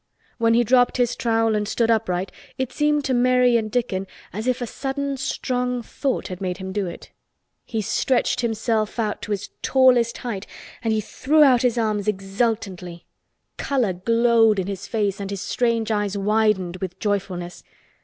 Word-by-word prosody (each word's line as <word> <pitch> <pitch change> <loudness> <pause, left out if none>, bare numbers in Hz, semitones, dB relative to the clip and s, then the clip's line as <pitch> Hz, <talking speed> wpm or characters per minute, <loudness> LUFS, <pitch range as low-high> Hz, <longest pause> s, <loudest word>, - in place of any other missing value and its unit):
When 230 0 +3
he 240 - +4
dropped 245 +2 +3
his 245 -2 +1
trowel 225 -1 +1
and 210 -1 -1
stood 230 +1 +1
upright 190 -4 0 0.3
it 260 -1 -2
seemed 295 0 +1
to 265 - 0
Mary 250 0 +4
and 220 -2 +1
Dickon 200 -5 -1 0.3
as 215 +4 -4
if 255 0 +1
a 245 - -2
sudden 275 +3 -3
strong 250 -2 -2
thought 270 +3 -2
had 185 0 -7
made 180 -2 -2
him 190 -1 -6
do 200 -1 -1
it. 170 - -9 0.5
He 220 -2 -3
stretched 250 +3 +1
himself 225 -1 -1
out 215 -3 -1
to - - -7
his 200 -1 -3
tallest 250 -3 +4
height 220 -5 -5 0.3
and 225 -1 0
he 220 0 +1
threw 300 +8 +2
out 255 -4 +5
his 245 -2 +1
arms 215 -3 0
exultantly. 195 -3 -2 0.5
Color 250 -9 0
glowed 230 +2 +3
in 190 - -1
his 195 -1 -5
face 205 -4 -1
and 195 - -4
his 200 -1 -4
strange 230 -2 0
eyes 205 -1 -1
widened 200 -3 +1
with 185 -1 -5
joyfulness. 185 -4 -3
225 Hz, 175 wpm, -23 LUFS, 200-245 Hz, 0.5 s, out